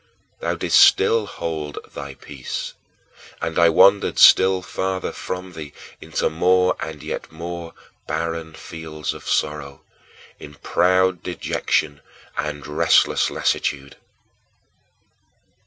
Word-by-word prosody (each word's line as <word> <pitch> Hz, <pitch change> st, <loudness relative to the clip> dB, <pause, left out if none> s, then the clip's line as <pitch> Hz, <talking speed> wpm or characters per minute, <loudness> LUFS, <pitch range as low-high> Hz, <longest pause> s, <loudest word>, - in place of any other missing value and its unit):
Thou -, -, -2 dB
didst -, -, +3 dB
still 115 Hz, -2 st, +5 dB
hold 80 Hz, -5 st, -5 dB, 0.2 s
thy 70 Hz, -2 st, -7 dB
peace, 65 Hz, -1 st, -6 dB, 0.7 s
and 80 Hz, +1 st, -2 dB
I 85 Hz, 0 st, +6 dB
wandered 100 Hz, +5 st, +4 dB
still 95 Hz, -1 st, +6 dB
farther 95 Hz, +1 st, -3 dB
from 90 Hz, 0 st, -6 dB
thee 75 Hz, -3 st, -9 dB, 0.3 s
into -, -, -1 dB
more 90 Hz, +3 st, +2 dB
and 80 Hz, -2 st, -6 dB
yet -, -, -6 dB
more 85 Hz, +1 st, -7 dB, 0.3 s
barren 80 Hz, 0 st, -3 dB
fields 80 Hz, -3 st, -6 dB
of -, -, -12 dB
sorrow, 70 Hz, -2 st, -2 dB, 0.6 s
in 75 Hz, 0 st, -11 dB
proud 90 Hz, +3 st, +2 dB
dejection 75 Hz, -4 st, -2 dB, 0.3 s
and 75 Hz, -1 st, -4 dB
restless 75 Hz, -, +3 dB
lassitude. 70 Hz, 0 st, -2 dB
80 Hz, 105 wpm, -22 LUFS, 75-90 Hz, 0.7 s, I